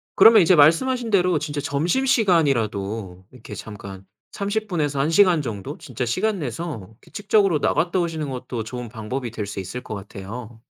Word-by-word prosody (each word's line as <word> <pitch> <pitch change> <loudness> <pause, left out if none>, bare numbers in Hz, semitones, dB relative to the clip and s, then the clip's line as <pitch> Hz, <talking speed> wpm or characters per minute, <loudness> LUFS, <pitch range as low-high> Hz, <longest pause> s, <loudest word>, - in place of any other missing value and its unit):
그러면 220 +2 +8
이제 175 +1 +5
말씀하신 225 - +4
대로 180 -4 +3
진짜 145 -1 -4
점심시간이라도 140 - 0
이렇게 115 -4 -11
잠깐 100 -2 -9 0.3
30 215 +1 -2
분에서 150 -7 -1
1 145 +4 +1
시간 180 -2 +4
정도 115 +2 -6
진짜 125 -3 -5
시간 195 - 0
내서 125 - -5
규칙적으로 205 -6 +1
나갔다 175 +2 +1
오시는 160 -4 -2
것도 125 -3 -5
좋은 120 +1 -7
방법이 120 +2 -5
될 110 -3 -4
수 100 -1 -6
있을 95 +7 -6
것 110 - -6
같아요. 110 +4 -9
140 Hz, 360 characters per minute, -22 LUFS, 110-180 Hz, 0.3 s, 그러면